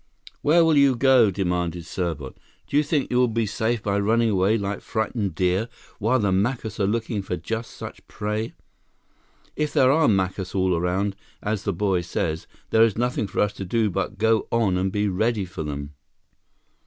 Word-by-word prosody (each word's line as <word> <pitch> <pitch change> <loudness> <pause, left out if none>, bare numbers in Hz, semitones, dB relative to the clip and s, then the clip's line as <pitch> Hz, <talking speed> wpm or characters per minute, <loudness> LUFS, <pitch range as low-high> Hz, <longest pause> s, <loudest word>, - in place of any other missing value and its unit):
"Where 165 +3 +5
will 160 -2 +4
you 140 -2 +5
go?" 125 -3 +5
demanded 90 -3 -2
Serbot. 80 -8 -4 0.3
"Do - - -6
you 145 - +6
think 150 -2 -1
you 125 - +2
will 125 0 +4
be 115 0 0
safe 110 +2 -1
by 100 0 0
running 115 +2 +2
away 100 +3 +2
like 100 -1 -3
frightened 110 -4 -2
deer, 95 +6 +1 0.3
while 115 +5 +2
the 100 -5 +1
Macus 110 +2 -1
are 100 - +2
looking 110 -1 -1
for 90 -2 -4
just 115 +7 -4
such - - -10
prey? 105 +2 -3 1.0
If 150 -1 -1
there 130 0 +5
are 160 +2 +4
Macus 95 -2 0
all 95 -1 +2
around, 95 +4 0 0.3
as 105 -1 -2
the 100 - +1
boy 95 0 +1
says, 80 -2 -3 0.2
there 110 - +4
is 115 -2 +4
nothing 120 -3 0
for 95 - -1
us 105 -1 +1
to - - -6
do 105 +2 0
but 95 +3 -3
go 110 +1 +2
on 115 -5 +2
and 95 +1 0
be 105 +1 0
ready 105 +2 0
for 90 - -7
them!" 70 -1 -5
105 Hz, 190 wpm, -24 LUFS, 95-115 Hz, 1.0 s, you